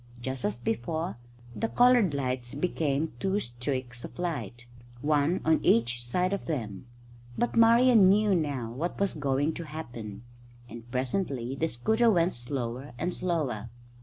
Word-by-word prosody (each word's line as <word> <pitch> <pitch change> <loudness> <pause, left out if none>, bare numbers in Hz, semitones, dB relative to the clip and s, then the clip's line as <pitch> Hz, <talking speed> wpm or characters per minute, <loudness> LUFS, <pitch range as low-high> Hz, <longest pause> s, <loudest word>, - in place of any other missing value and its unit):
Just 130 +1 -4
as 105 +2 -1
before, 120 +3 -2 0.4
the 225 - -1
coloured 245 - +4
lights 125 -2 -2
became 155 -1 -1
two 195 +5 +1
streaks 125 - -4
of - - -9
light, 155 -9 -4 0.4
one 150 +4 +2
on 160 0 +4
each 120 +1 +2
side 180 +10 0
of 200 - -4
them. 115 - -4 0.5
But 240 - 0
Marian 230 -3 +6
knew 205 +1 +4
now 140 -9 -1
what 155 +9 -4
was 200 -1 +1
going 145 +1 0
to 170 - -6
happen, 120 -9 -7 0.4
and 120 0 -10
presently 130 0 -2
the 155 +4 0
scooter 220 - +2
went 175 -3 +3
slower 120 +1 -4
and 175 +6 -2
slower. 145 - -2
145 Hz, 145 wpm, -28 LUFS, 120-180 Hz, 0.5 s, Marian